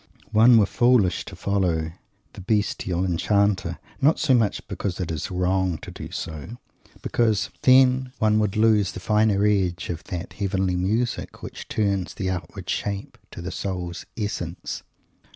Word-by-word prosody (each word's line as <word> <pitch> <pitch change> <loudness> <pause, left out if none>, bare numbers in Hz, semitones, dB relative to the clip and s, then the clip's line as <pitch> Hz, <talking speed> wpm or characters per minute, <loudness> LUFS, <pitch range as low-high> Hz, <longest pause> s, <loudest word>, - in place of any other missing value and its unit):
One 115 +2 +7
were 105 - +5
foolish 120 -5 +3
to - - -9
follow 90 -5 0 0.4
the - - -9
bestial 95 -3 0
enchanter; 100 +2 +1 0.2
not 150 +4 +4
so 150 -5 +2
much 115 -5 +1
because 95 -2 -4
it 90 -3 -2
is 80 -2 -3
"wrong" 90 -1 0
to - - -9
do - - -8
so, 80 - -6 0.4
as - - -22
because, 110 -5 +1
then, 130 0 +5
one 110 0 +3
would 105 -1 0
lose 110 -4 +3
the - - -6
finer 105 0 +2
edge 90 -5 +1
of 80 - -6
that 90 -1 -5
heavenly 95 -2 0
music 110 +7 -1
which - - -8
turns 100 -3 -1
the 95 -3 -2
outward 85 -4 -6
shape 100 -1 -3
"to 85 - -9
the 95 - -4
soul's 90 -2 -4
essence." 90 -5 -4
100 Hz, 155 wpm, -24 LUFS, 90-110 Hz, 0.4 s, One